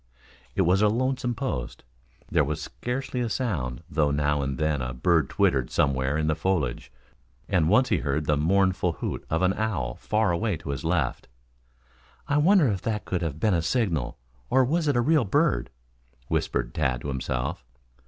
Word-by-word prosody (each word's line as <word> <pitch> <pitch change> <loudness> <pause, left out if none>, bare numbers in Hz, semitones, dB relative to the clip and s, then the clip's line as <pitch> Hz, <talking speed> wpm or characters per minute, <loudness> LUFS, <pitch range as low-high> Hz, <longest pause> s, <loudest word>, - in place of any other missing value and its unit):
It - - +3
was 95 +3 +3
a 105 - +5
lonesome 125 +2 0
post. 115 - -4 0.4
There 80 -3 +2
was 75 +1 -2
scarcely 125 +1 -4
a 120 - -1
sound, 85 - -2
though 75 -2 +1
now 75 0 +1
and 70 -1 -2
then 75 -3 0
a 60 0 -4
bird 80 +2 +2
twittered 65 -3 +1
somewhere 70 +1 +1
in 80 - 0
the 80 - +2
foliage 75 -8 -1 0.6
and 85 -5 +2
once 125 +6 +4
he 105 - +3
beard 75 0 -1
the 75 - +2
mournful 90 +3 +2
hoot - - -4
of 80 +3 0
an 95 +1 +3
owl 100 - -2
far 110 -3 +1
away 95 +1 0
to 80 -2 -6
his 70 - -4
left. 80 -6 -1 1.0
"I 145 - +1
wonder 170 0 +5
if 95 -4 -2
that 105 -3 -2
could 90 -1 -2
have 80 -3 -3
been 105 +1 +2
a 85 - +2
signal, 85 - -1 0.3
or 130 0 +4
was 160 +4 0
it 145 - +2
a - - +4
real 150 +2 +3
bird," 60 - +1 0.6
whispered - - -1
Tad 65 -5 0
to - - -6
himself. 65 -2 -3
85 Hz, 185 wpm, -26 LUFS, 70-110 Hz, 1.0 s, a